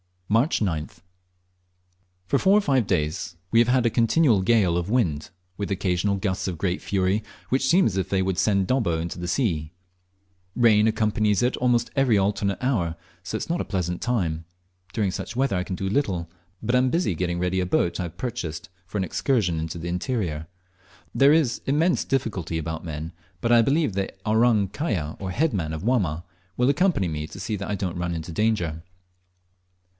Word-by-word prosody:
March 115 - +2
9th. 85 -4 -2 1.2
For 140 +9 +1
four 195 +2 +5
or - - +4
five 135 - +1
days 85 +2 -1 0.2
we 115 - +5
have 120 - +5
had 125 -1 +3
a - - +4
continual 115 0 +3
gale 95 -4 +3
of 90 +2 -2
wind, 85 - 0 0.3
with 100 - -3
occasional 95 0 0
gusts 95 -1 -2
of 90 -3 -3
great 90 +1 -1
fury, 95 +1 0 0.3
which 130 +1 +1
seem 180 +6 +5
as 95 -4 0
if 95 -1 -1
they 95 -1 +1
would 95 -1 -1
send 100 -3 +2
Dobbo 105 -9 +1
into 85 +2 -4
the 90 - -4
sea. 85 - -1 0.8
Rain 110 -3 +5
accompanies 110 -1 +1
it 125 - +1
almost 120 -1 +1
every 135 -6 +3
alternate 100 0 0
hour, 95 -11 0 0.3
so 90 +4 -5
that - - -6
it - - -2
is - - -22
not 170 +1 0
a - - -3
pleasant 90 -3 -2
time. 85 -10 -1 0.5
During 105 -4 0
such 115 - -6
weather 130 -6 +1
I 90 - -2
can 95 - -4
do 95 +2 -3
little, 95 - -1 0.3
but 120 +3 +1
am 130 +1 +3
busy 170 - +1
getting 85 +1 -2
ready 90 +1 0
a 90 - 0
boat 85 0 0
I - - 0
have 85 -1 -7
purchased, 100 -12 -4 0.2
for 105 - -5
an 95 - +1
excursion 95 - 0
into 80 +1 -4
the 85 +1 -5
interior. 90 - -2 0.7
There 140 +2 +5
is 150 -7 +2
immense 160 +6 +2
difficulty 105 -11 -2
about 80 +1 -4
men, 80 0 -5 0.3
but 120 - +1
I 120 -1 +7
believe 145 - +1
the 95 0 -1 0.2
"Orang 110 -2 +3
kaya," 100 - -3
or 95 - -4
head 150 - +1
man 80 -5 -2
of 80 +2 -5
Wamma, 95 -10 +1 0.3
will 125 +2 +3
accompany 145 - +2
me 75 0 -4
to 95 - -10
see 105 +3 -3
that 95 - -5
I 105 - 0
don't 90 -3 -3
run 85 -1 -2
into 80 +1 -5
danger. 90 -5 0
100 Hz, 195 wpm, -25 LUFS, 85-120 Hz, 1.2 s, I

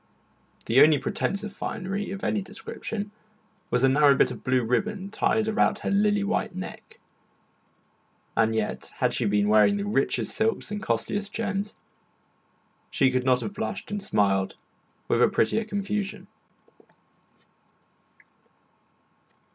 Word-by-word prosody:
The 120 +4 +5
only 155 -1 +7
pretence 200 +8 -2
of 210 -1 -6
finery 200 0 -4
of 195 +1 -6
any 210 - 0
description 205 +1 -6 0.6
was 125 +1 +1
a - - +7
narrow 140 +1 +5
bit - - +3
of - - -8
blue 130 -1 +2
ribbon 195 - -1
tied 220 0 +1
about 220 +1 +2
her - - 0
lily 205 0 +2
white 200 -3 -1
neck. 185 - -8 1.4
And 110 0 +2
yet, 110 -1 -2
had - - +1
she - - 0
been 105 0 +2
wearing 110 - +5 0.2
richest 135 - 0
silks 220 -1 0
and 210 -1 -3
costliest 200 - -2
gems, 205 -2 -3 1.1
she 135 -4 +2
could 130 0 0
not 125 -1 +3
have 110 -3 -4
blushed 110 - -4
and 205 0 -2
smiled 100 - +1 0.5
with - - +2
a - - +7
prettier 220 - +1
confusion. 205 0 -3
195 Hz, 130 wpm, -26 LUFS, 125-205 Hz, 1.4 s, only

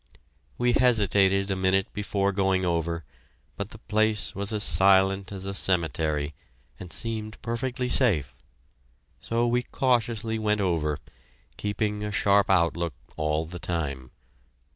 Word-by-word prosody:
We 120 0 +2
hesitated 100 -5 +3
a - - 0
minute 95 +1 +1
before 100 -1 0
going 95 -1 +1
over, 85 -1 -1 0.5
but 100 0 -5
the 110 - -11
place 110 -1 0
was 100 +1 -2
as 105 -1 +2
silent 95 0 +4
as 95 -1 -6
a 100 - -4
cemetery, 80 -5 +1 0.5
and 90 -2 -9
seemed 110 -1 -3
perfectly 125 +2 -2
safe. 100 - +1 0.8
So 115 +1 -1
we 120 +1 +2
cautiously 115 -3 0
went 105 -1 +1
over, 80 -6 0 0.6
keeping 105 0 -2
a 105 - -3
sharp 100 0 +3
outlook 85 -4 +1 0.2
all 75 +1 -1
the 90 +2 -8
time. 70 -8 -3
100 Hz, 130 wpm, -26 LUFS, 85-110 Hz, 0.8 s, silent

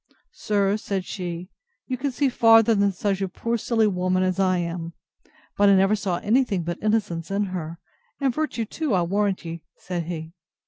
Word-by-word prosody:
Sir, 205 -1 +1
said 195 -3 -3
she, 180 -1 -5 0.3
you 255 - -2
can 270 +3 -2
see 275 +3 +1
farther 225 -2 +5
than 200 -1 +2
such 195 +1 -2
a 195 - -1
poor 230 +5 -2
silly 225 0 +1
woman 185 -2 +1
as 185 0 0
I 185 -1 +3
am; 170 -1 -4 0.6
but 205 0 +4
I 200 - +6
never 195 +2 +4
saw 190 -4 -2
any 240 +9 +3
thing 195 -8 -2
but 170 +1 -4
innocence 210 -7 0
in 200 +1 0
her—And 190 - -5
virtue 290 -6 -2
too, 290 0 -1
I'll 175 -2 +2
warrant 195 0 0
ye! 165 0 -6 0.2
said 175 -2 -4
he. 165 -1 -6
195 Hz, 185 wpm, -24 LUFS, 180-225 Hz, 0.6 s, I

